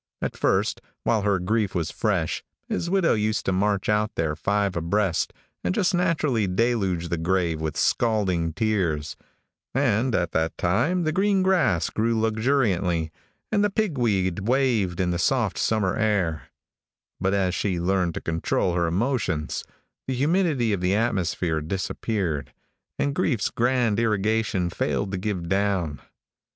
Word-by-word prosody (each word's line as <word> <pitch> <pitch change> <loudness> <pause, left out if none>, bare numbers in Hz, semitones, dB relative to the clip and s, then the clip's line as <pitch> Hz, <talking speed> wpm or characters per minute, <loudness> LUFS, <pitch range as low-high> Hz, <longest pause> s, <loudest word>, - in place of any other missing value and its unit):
At - - -3
first, - - +1 0.2
while 110 -2 +2
her 100 -1 +2
grief 100 +3 0
was 85 -3 -1
fresh, - - -1 0.2
his 170 - -2
widow 190 -2 +3
used 110 0 0
to - - +1
march 100 +1 +1
out 105 +1 +1
there 80 -2 0
five 100 +4 0
abreast, 85 +2 0 0.3
and 90 0 0
just 190 +2 +2
naturally 155 - +1
deluge 95 -4 0
the 85 - -1
grave 85 -2 0
with 80 -2 -3
scalding 95 -8 +1
tears, 80 -7 -1 0.6
and 125 -2 +2
at 85 -2 0
that 80 0 -1
time 125 - +1
the 155 - +1
green 195 +2 +2
grass 180 - +2
grew 115 +1 +1
luxuriantly, 110 - +1 0.4
and 210 -1 +2
the 205 - +3
pig 205 -5 -1
weed 100 -5 0
waved 120 -9 +1
in 90 -1 +1
the 85 - -1
soft 120 -3 +1
summer 105 -4 +1
air; 95 -8 0 0.7
but 95 +1 +1
as 95 -2 +1
she 95 -2 -1
learned 90 -1 0
to - - -4
control 80 +2 0
her 85 -1 +1
emotions, 90 - -1 0.4
the 130 - -1
humidity 145 - +1
of 95 - -2
the 90 +2 +2
atmosphere 90 -7 0
disappeared, 90 -1 -2 0.5
and 140 - 0
grief's 135 - 0
grand 120 -3 +1
irrigation 110 -4 +1
failed 100 +3 -1
to 95 - -2
give 90 -3 -3
down. 95 -5 0
100 Hz, 150 wpm, -25 LUFS, 90-120 Hz, 0.7 s, widow